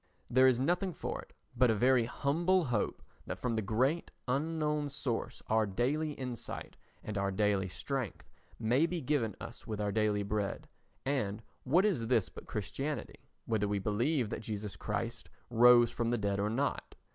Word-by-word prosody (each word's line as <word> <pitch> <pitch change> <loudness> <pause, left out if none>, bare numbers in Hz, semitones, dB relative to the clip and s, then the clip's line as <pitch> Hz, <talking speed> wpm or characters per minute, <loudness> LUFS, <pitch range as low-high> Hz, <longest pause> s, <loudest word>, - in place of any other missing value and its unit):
There 130 +2 +6
is 130 -2 +4
nothing 175 +7 +1
for - - -4
it - - -17 0.2
but 125 0 +4
a 110 - +3
very 125 +1 +4
humble 165 +8 +1
hope 120 -5 -1 0.2
that - - -3
from 125 -2 -1
the 110 - +1
Great 130 - +1 0.2
Unknown 150 +2 0
Source 125 -4 -3
our 110 -1 +2
daily 145 +10 0
insight 125 -4 -6 0.3
and 105 -2 -3 0.2
daily 105 -3 +2
strength 130 +5 -4 0.3
may 125 +8 +3
be 175 0 -2
given 130 - 0
us 115 - -9
with 110 -2 -3
our 105 -1 0
daily 105 -1 +1
bread. 100 0 -2 0.4
And 115 -6 -1 0.2
what 170 +10 +4
is 145 - +1
this 115 -5 +2
but - - -11
Christianity, 135 +5 -4 0.2
whether 110 -3 +1
we 100 0 0
believe 115 +5 0
that - - -3
Jesus 105 -2 -4
Christ 115 +2 -3 0.2
rose 120 0 +7
from 120 -1 -1
the 120 - +1
dead 100 -2 0
or 105 +1 +1
not? 135 +6 -1
120 Hz, 170 wpm, -33 LUFS, 105-140 Hz, 0.4 s, rose